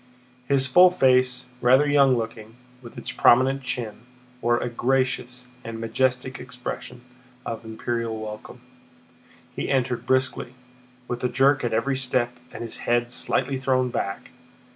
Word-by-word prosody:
His 135 Hz, -1 st, +2 dB
full 180 Hz, +8 st, +7 dB
face, 130 Hz, -6 st, +2 dB, 0.2 s
rather 130 Hz, +4 st, +5 dB
young 140 Hz, -3 st, +4 dB
looking, 115 Hz, -1 st, -6 dB, 0.3 s
with 120 Hz, -2 st, -12 dB
its -, -, -5 dB
prominent 130 Hz, +3 st, +4 dB
chin, 120 Hz, -4 st, -4 dB, 0.4 s
wore 120 Hz, 0 st, +2 dB
a -, -, -2 dB
gracious 125 Hz, 0 st, -1 dB, 0.2 s
and 115 Hz, 0 st, -6 dB
majestic 125 Hz, +3 st, -1 dB
expression 125 Hz, 0 st, -7 dB, 0.4 s
of 115 Hz, 0 st, -5 dB
imperial 115 Hz, 0 st, -3 dB
welcome. 110 Hz, 0 st, -8 dB, 0.9 s
He -, -, -3 dB
entered 125 Hz, -2 st, 0 dB
briskly, 130 Hz, -1 st, 0 dB, 0.5 s
with 125 Hz, 0 st, -4 dB
a 125 Hz, -, +2 dB
jerk 135 Hz, +3 st, +3 dB
at 120 Hz, -, -1 dB
every 130 Hz, +5 st, 0 dB
step 125 Hz, -2 st, 0 dB, 0.2 s
and -, -, -7 dB
his 115 Hz, -, -5 dB
head 120 Hz, 0 st, 0 dB
slightly 135 Hz, +1 st, -1 dB
thrown 130 Hz, -1 st, +1 dB
back. 100 Hz, -3 st, -4 dB
125 Hz, 140 wpm, -24 LUFS, 120-130 Hz, 0.9 s, full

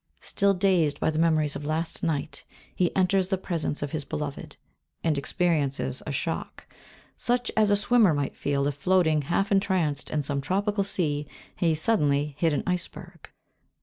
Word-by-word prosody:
Still 200 Hz, 0 st, +1 dB
dazed 180 Hz, -6 st, +2 dB
by -, -, +1 dB
the 155 Hz, -, -2 dB
memories 155 Hz, -3 st, +2 dB
of -, -, -5 dB
last 155 Hz, +2 st, -2 dB
night, 155 Hz, -2 st, -2 dB, 0.3 s
he 180 Hz, -2 st, 0 dB
enters 190 Hz, 0 st, +2 dB
the 190 Hz, -, +1 dB
presence 165 Hz, -5 st, -3 dB
of 145 Hz, -, -4 dB
his 155 Hz, -2 st, -3 dB
beloved, 145 Hz, 0 st, -5 dB, 0.5 s
and 160 Hz, -2 st, +2 dB
experiences 140 Hz, -4 st, -1 dB
a -, -, -2 dB
shock, 160 Hz, +4 st, -4 dB, 0.5 s
such 245 Hz, +1 st, 0 dB
as 215 Hz, -1 st, +4 dB
a 205 Hz, -, +5 dB
swimmer 215 Hz, -1 st, +4 dB
might 145 Hz, -1 st, -2 dB
feel, 140 Hz, -1 st, -1 dB
if 145 Hz, -, 0 dB
floating, 160 Hz, +1 st, +2 dB
half 175 Hz, +8 st, -1 dB
entranced, 185 Hz, -7 st, +1 dB
in 150 Hz, -1 st, -1 dB
some 140 Hz, 0 st, -2 dB
tropic 200 Hz, +6 st, 0 dB
sea, 150 Hz, -7 st, -1 dB, 0.3 s
he 165 Hz, -3 st, +2 dB
suddenly 150 Hz, -5 st, +1 dB
hit 165 Hz, 0 st, +3 dB
against 145 Hz, -, -1 dB
an 180 Hz, -, +3 dB
iceberg. 180 Hz, -1 st, -8 dB
160 Hz, 170 wpm, -26 LUFS, 145-190 Hz, 0.5 s, a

